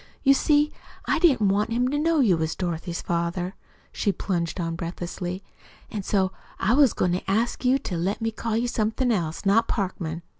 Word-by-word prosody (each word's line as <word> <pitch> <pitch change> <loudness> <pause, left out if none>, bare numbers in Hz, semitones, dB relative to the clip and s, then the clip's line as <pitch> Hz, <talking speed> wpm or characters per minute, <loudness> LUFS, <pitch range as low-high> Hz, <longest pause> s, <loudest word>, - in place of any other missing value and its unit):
You 275 - +7
see, 295 +2 +3 0.3
I - - +1
didn't 265 - +4
want 205 +3 +1
him 245 +2 +1
to 290 - 0
know 320 -1 +3
you 205 -9 +4
was 160 0 -2
Dorothy's 175 -1 -3
father," 175 +2 -1 0.4
she 200 - 0
plunged 175 -2 -2
on 165 -1 -2
breathlessly, 175 +2 -5 0.5
"an' 210 - -3
so 190 -1 +1 0.3
I 220 - +2
was 275 -3 +5
goin' 180 - +1
to 180 +2 -2
ask 225 +7 0
you 255 +1 +4
to 190 -10 -4
let 185 +5 -1
me 225 0 -1
call 225 0 -2
you 240 +1 0
somethin' 235 +2 0
else 170 -4 -2
not 225 +4 +4
Parkman. 175 -5 -3
200 Hz, 190 wpm, -25 LUFS, 175-235 Hz, 0.5 s, You